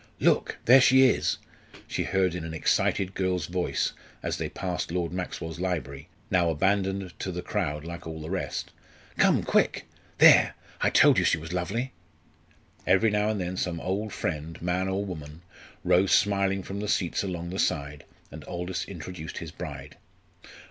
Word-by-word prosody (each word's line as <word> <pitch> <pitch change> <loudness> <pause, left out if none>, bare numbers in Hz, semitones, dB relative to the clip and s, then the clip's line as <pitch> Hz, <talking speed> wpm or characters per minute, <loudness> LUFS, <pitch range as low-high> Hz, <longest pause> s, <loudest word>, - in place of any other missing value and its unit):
"Look, - - +2
there 130 +3 +8
she 130 +1 +6
is," - - +1 0.5
she - - -2
heard 95 -2 +1
in 90 -2 -4
an 80 0 -5
excited 95 +4 +1
girl's 90 -4 -1
voice 90 0 -1 0.3
as - - -2
they - - -2
passed 90 -3 -3
Lord 85 -1 -1
Maxwell's 85 -2 -5
library, 80 -5 -3 0.2
now 90 -3 +3
abandoned 95 +2 0
to 95 - -3
the 90 0 -5
crowd 75 -7 -2
like 85 0 -7
all 80 0 -6
the 80 +2 -7
rest. 95 - -3 0.5
"Come, - - +4
quick! - - +1 0.3
There - - +7 0.3
I - - +4
told - - +6
you - - +2
she - - +3
was 80 +2 -7
lovely!" 105 +9 -2 0.9
Every 100 +4 +4
now 105 0 +1
and 110 -2 -1
then 90 0 -3
some 85 -2 -2
old 100 +5 -2
friend, 80 -1 -4
man 90 +2 -1
or 95 +1 -1
woman, 80 -3 -8 0.4
rose 90 +1 +3
smiling 100 -1 +2
from 100 +2 -6
the 105 - -3
seats 90 -4 0
along 85 -3 -4
the 95 - -4
side, 70 -4 -1 0.3
and 80 0 -9
Aldous 90 +1 -4
introduced 85 -3 -8
his - - -6
bride. - - -8
90 Hz, 170 wpm, -27 LUFS, 85-95 Hz, 0.9 s, there